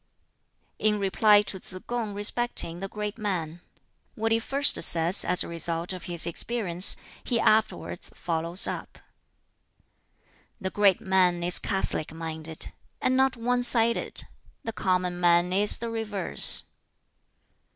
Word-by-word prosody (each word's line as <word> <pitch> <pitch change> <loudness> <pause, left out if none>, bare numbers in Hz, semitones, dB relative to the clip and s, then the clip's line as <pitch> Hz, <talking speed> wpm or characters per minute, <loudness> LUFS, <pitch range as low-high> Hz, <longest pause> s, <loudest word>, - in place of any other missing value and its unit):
In 215 -1 +1
reply 205 +1 +3
to 195 -2 -6
Tsz 185 - -11
kung 230 -4 -4
respecting 205 -4 +1
the 195 - -5
great 210 +2 -6
man: 175 -5 -4 0.5
"What 225 +1 -2
he 225 - +2
first 275 +5 +1
says, 170 +3 +5
as 180 +1 +1
a - - -8
result 170 +1 -3
of 185 - -9
his 170 -2 +1
experience, 180 0 +3 0.3
he 235 - -1
afterwards 215 -5 0
follows 170 +2 -2
up. - - -4 1.6
"The 190 -3 -5
great 200 -3 +2
man 180 -2 +1
is 175 +1 +2
catholic 190 -5 -3
minded, 160 -1 -5 0.3
and 255 - 0
not 265 -1 +1
one 245 +1 -1
sided. 235 -1 +1 0.4
The 225 - -6
common 180 -2 -2
man 175 +1 +2
is 205 +2 +1
the 235 0 -6
reverse. 210 -5 +4
195 Hz, 130 wpm, -25 LUFS, 175-225 Hz, 1.6 s, says